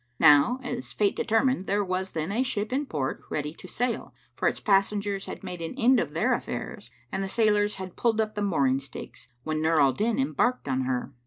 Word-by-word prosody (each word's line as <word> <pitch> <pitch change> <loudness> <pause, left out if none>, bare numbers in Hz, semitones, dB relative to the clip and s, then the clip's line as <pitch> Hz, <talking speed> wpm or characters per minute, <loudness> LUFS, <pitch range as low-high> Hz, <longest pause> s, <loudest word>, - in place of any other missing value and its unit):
Now 150 - +6
as 245 0 -5
Fate 205 -2 +1
determined 225 -3 +1
there 205 +1 +1
was 185 +1 -2
then 160 +3 -2
a 225 +5 +1
ship 215 -3 -2
in 280 +2 0
port 140 - -3
ready 150 0 -3
to 185 - -12
sail, 245 +5 -2 0.2
for - - 0
its - - 0
passengers 200 0 +1
had - - -8
made 180 -2 -6
an 165 +10 -5
end 255 0 +5
of - - -3
their - - +2
affairs[FN#550] - - -5 0.2
and 195 - -2
the 195 - -3
sailors 210 -1 +2
had 190 -2 -7
pulled 225 -2 +1
up 215 -1 0
the 210 - -3
mooring 140 -9 +2
stakes, 135 -3 -10 0.2
when 155 0 -2
Nur 160 0 +3
al 135 -2 +5
Din 220 - 0
embarked 255 - 0
in 130 -1 0
her. 130 +1 -2
195 Hz, 215 wpm, -27 LUFS, 155-225 Hz, 0.2 s, Now